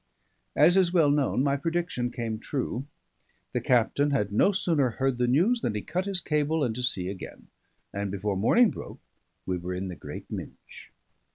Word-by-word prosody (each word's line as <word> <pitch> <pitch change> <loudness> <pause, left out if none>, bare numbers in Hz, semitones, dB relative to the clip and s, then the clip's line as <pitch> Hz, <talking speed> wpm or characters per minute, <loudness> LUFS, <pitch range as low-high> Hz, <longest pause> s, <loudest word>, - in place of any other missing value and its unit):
As 170 +5 +5
is 185 -3 +4
well 165 -5 +4
known, 140 -2 +1
my 140 -1 +2
prediction 165 -5 -1
came 115 -3 -4
true. 130 +1 -3 0.7
The - - 0
captain 125 +4 +2
had 120 -8 0
no 110 - +4
sooner 160 -8 +1
heard 135 -2 0
the 125 - +2
news 185 - +3
than 110 - -1
he 105 - -3
cut 185 +4 -2
his 190 -2 +1
cable 150 0 0
and 120 - 0
to 125 - -5
sea 95 -7 -1
again; 95 0 -8 0.4
and 100 0 -2
before 100 +1 -2
morning 205 - +4
broke, - - -9 0.5
we 90 -1 -2
were 90 +1 -4
in 95 +1 -4
the 90 - -6
Great - - -9
Minch. - - -9
135 Hz, 185 wpm, -27 LUFS, 105-160 Hz, 0.7 s, As